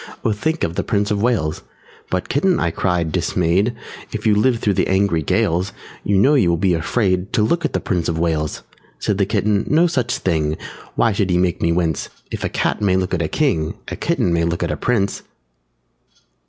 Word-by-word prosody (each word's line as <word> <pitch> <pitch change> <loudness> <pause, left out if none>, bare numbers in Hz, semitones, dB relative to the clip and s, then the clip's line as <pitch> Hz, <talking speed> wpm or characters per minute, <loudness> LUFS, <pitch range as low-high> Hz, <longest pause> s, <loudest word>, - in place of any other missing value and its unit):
_ - - -13
Oh, 115 - +3
think 155 +10 -1
of 80 - 0
the - - -2
Prince 105 0 0
of 100 -1 0
Wales!" 105 -10 0 0.5
"But, 90 -1 -2
Kitten," 180 +5 +2
I 85 - 0
cried, 85 -2 0
dismayed, 90 +10 +1 0.4
"If - - -5
you 110 - +5
live 115 +4 +3
through 105 -2 0
the - - +1
angry 95 -3 +2
gales 85 +5 0 0.3
You 100 -1 +1
know 135 +10 +5
you 125 -12 +4
will 85 - +2
be 95 +1 +2
afraid 95 +2 0
To 105 - +3
look 170 +9 +1
at - - -2
the - - +1
Prince 90 -7 -1
of 80 - -1
Wales!" 80 -2 -1 0.3
Said 105 -1 -1
the 100 - +2
Kitten, 105 0 +1
"No 160 +3 +4
such 140 -9 0
thing! 80 -4 0 0.4
Why 115 - +3
should 100 -1 0
he 90 - +2
make 90 -1 0
me 85 - +2
wince? 85 -3 0 0.2
If - - -4
a - - 0
Cat - - -1
may 95 -3 +3
look 95 0 -1
at 90 - 0
a 80 - 0
King, 80 - 0
_A - - -6
Kitten 85 - +1
may 85 0 +2
look 85 0 -1
at - - -1
a - - -1
Prince!" 100 -5 0
95 Hz, 220 wpm, -20 LUFS, 85-110 Hz, 0.5 s, you